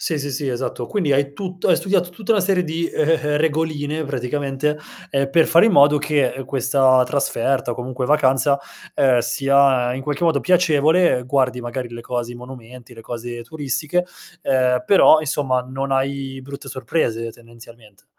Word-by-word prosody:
Sì, 160 - -2
sì, 140 0 -4
sì, 140 +1 -3
esatto. 125 -1 -4
Quindi 170 - 0
hai 140 +1 +1
tutto 180 +3 -4
hai - - +5
studiato 190 -2 0
tutta 205 +4 -2
una 210 - +2
serie 185 -1 +1
di, 165 +1 -2
ehm, 155 - -1
ehm, 165 0 +3
ehm, 150 0 0
regoline 155 0 -1
praticamente, 140 +2 -2 0.3
ehm, 135 -1 -1
per 165 +3 +4
fare 170 +5 +5
in 225 - +2
modo 145 -1 +5
che, 145 -3 0
ehm, 135 - -7
questa 130 0 +2
trasferta 135 -1 -1
o - - -3
comunque 125 +1 -5
vacanza, 140 0 +2 0.4
ehm, 130 -3 +3
sia 135 -2 +2
in 130 - -6
qualche 145 +4 -2
modo 160 -4 +2
piacevole, 170 -4 +3
uhm, 125 - -11
guardi 130 -2 0
magari 120 +1 -5
le 120 0 -9
cose 120 0 -4
i - - -11
monumenti, 125 0 -12
le 115 - -12
cose 120 +1 -7
turistiche, 150 +6 -2 0.4
ehm, 125 -2 +1
però 160 -4 +6
insomma 135 -4 -1
non 135 +2 -5
hai 135 0 -2
brutte 140 +1 -9
sorprese 115 -5 -2
tendenzialmente. 115 -3 -17
135 Hz, 180 wpm, -20 LUFS, 125-150 Hz, 0.4 s, però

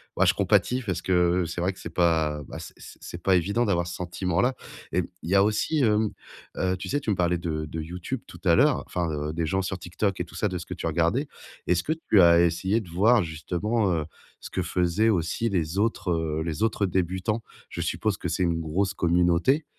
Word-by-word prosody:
bah, - - +3
je - - +4
compatis 130 +1 +2
parce 95 -6 -2
que 90 0 +2
c'est - - -5
vrai 95 +2 0
que 95 - -16
c'est - - -7
pas, 80 -4 +1
bah, - - -7
c'est - - -10
c'est - - -10
pas 95 - +4
évident 100 +7 +1
d'avoir 85 -5 +1
ce 85 - -5
sentiment 90 0 -2
là 125 +2 +2 0.4
et 90 - +2 0.2
il 80 - -5
y - - +4
a 100 - +6
aussi, 110 +9 +1
hem, 105 -2 +2 0.5
heu, 95 0 0
tu 95 - -6
sais, 145 - +1
tu 130 - -5
me 105 - +2
parlais 90 -1 +1
de 80 -3 -3
de 80 +2 -5
YouTube 85 +2 -5
tout - - -12
à - - +5
l'heure, - - +3
enfin, 85 -2 -2
heu, 75 0 -3
des 80 0 -1
gens 95 +4 0
sur 95 0 -3
TikTok 90 +3 -2
et - - 0
tout 85 - -15
ça 105 - 0
de 90 -1 -4
ce 85 - -9
que 90 - -5
tu - - -6
regardais. 85 - +1 0.4
Est-ce 90 0 +2
que 155 - 0
tu 100 - +6
as 85 -1 +7
essayé 95 +5 +1
de 95 - -12
voir 105 +5 +4
justement, 90 +7 -1
heu, 80 -3 0 0.4
ce - - -9
que - - -1
faisaient 90 +5 +1
aussi 95 +4 0
les 90 -2 -1
autres, 105 -4 0
heu, 80 -2 -1
les 80 -3 -4
autres 110 -2 +1
débutants? 95 +4 -1 0.3
Je - - -5
suppose - - -1
que - - -4
c'est 95 - 0
une 85 -2 +1
grosse 90 +5 -1
communauté, 90 - +2
90 Hz, 235 wpm, -26 LUFS, 85-100 Hz, 0.5 s, as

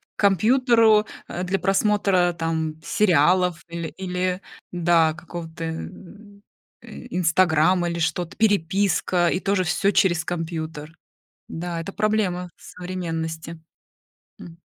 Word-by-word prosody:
к - - -47
компьютеру, 220 +2 +4 0.2
э, 180 - -4
для 190 +2 0
просмотра 195 -3 +2
там 160 -1 -2
сериалов 180 -4 +2
или 170 -1 -5
или, 185 0 -2 0.3
да, 170 -2 +3
какого-то, 165 0 -8
э, 160 0 -4 1.0
Инстаграма, 175 0 +1
или 170 - -3
что-то, 165 +2 -2
переписка- 190 -3 +1
и 180 - 0
тоже 195 -1 0
всё 195 +3 +1
через 175 -5 +2
компьютер. 160 -2 -5 0.5
Да, 170 0 -4
это 195 +4 -6
проблема 200 -4 -1
современности. 165 -2 -6 0.8
М. 170 -1 -11
175 Hz, 105 wpm, -23 LUFS, 165-195 Hz, 1.0 s, компьютеру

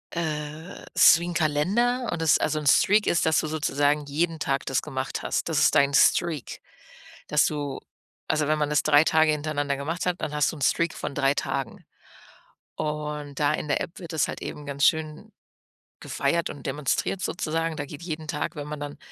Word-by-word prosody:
äh, 155 +1 -5
ist 165 - +7
wie 170 - -4
'n 175 - -4
Kalender 200 +11 +1
und 165 - -3
es 160 - +4
also, 155 0 0
'n 150 - -7
Streak 205 +8 +4
ist, 170 - +2
dass 160 0 +3
du - - -4
sozusagen 145 -1 0
jeden 160 +3 -1
Tag 135 -2 -1
das 135 - 0
gemacht 130 0 -4
hast. - - -2
Das - - +1
ist - - +4
dein 140 0 +4
Streak, 150 -1 +2 0.7
dass 150 - +3
du 145 -3 -4 0.5
also, 155 -1 +1
wenn 155 0 +2
man 150 - 0
das 150 -1 +2
3 150 0 +5
Tage 160 -1 +4
hintereinander 145 -2 -2
gemacht 165 +6 -3
hat, 180 0 -1
dann 150 - -3
hast 150 -1 +1
du - - -9
'n 145 - -12
Streak 170 +4 +1
von - - -5
3 140 -1 +2
Tagen. 135 -3 -4 0.9
Und 150 -2 -4
da 145 - +2
in - - -3
der 140 - +1
App 170 - -6
wird 170 -2 -8
das 155 - +1
halt - - -6
eben 150 - -7
ganz 140 0 0
schön 160 +6 0 0.7
gefeiert 170 0 -1
und 145 - -9
demonstriert 150 +7 -1
sozusagen. 165 -1 -2
Da 145 - -3
geht 145 +2 -10
jeden 160 -2 -5
Tag 150 +1 -3
wenn 145 0 -5
man 150 0 -6
dann 145 0 -6
150 Hz, 200 wpm, -25 LUFS, 145-160 Hz, 0.9 s, ist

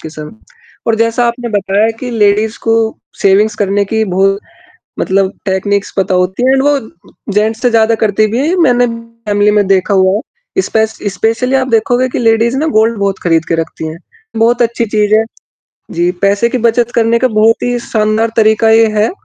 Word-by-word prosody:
के - - -8
समय 155 -1 -8
में 220 - -14 0.5
और 230 - +2
जैसा 230 +2 +1
आपने 235 0 -3
बताया 205 +1 0
कि 250 -1 -5
लेडीज़ 215 0 +1
को 225 0 +1 0.5
सेविंग्स 205 +2 +3
करने 200 0 0
की 220 0 +1
बहुत 195 +1 0 0.6
मतलब 190 0 0
टेक्निक्स 200 +1 -1
पता 190 0 0
होती 185 +6 -1
हैं 260 - +3
एंड 270 - +2
वो 290 0 +2 0.6
जेंट्स 220 +2 0
से 245 - +2
ज़्यादा 225 -1 +2
करती 215 0 +2
भी 235 - -1
है। 275 - 0
ये 360 - +1
मैंने 245 -1 +3 0.4
फ़ैमिली 205 0 +2
में 205 -1 +2
देखा 195 +1 +1
हुआ 190 -1 +3
है, 215 - -2 0.4
स्पेश 220 -8 -1 0.2
स्पेशली 230 +6 0
आप 260 0 +1
देखोगे 245 +2 +1
कि - - -3
लेडीज़ 230 +2 +2
ना 315 +3 0
गोल्ड 225 +1 +2
बहुत 200 -1 -1
खरीद 165 -2 +1
के 165 - +1
रखती 165 -1 -4
हैं, 155 - -7 0.4
बहुत 235 +2 +2
अच्छी 235 0 0
चीज़ 210 0 0
है। 220 - +3 0.7
जी, 175 +1 0
पैसे 200 +4 +2
की 255 - -2
बचत 235 +1 +1
करने 230 0 +2
का 255 - +1
बहुत 220 0 +2
ही 245 0 -1
शानदार 220 -1 -1
तरीका 220 0 +3
ये 225 0 +5
है 215 - +2
220 Hz, 195 wpm, -12 LUFS, 200-235 Hz, 0.7 s, ये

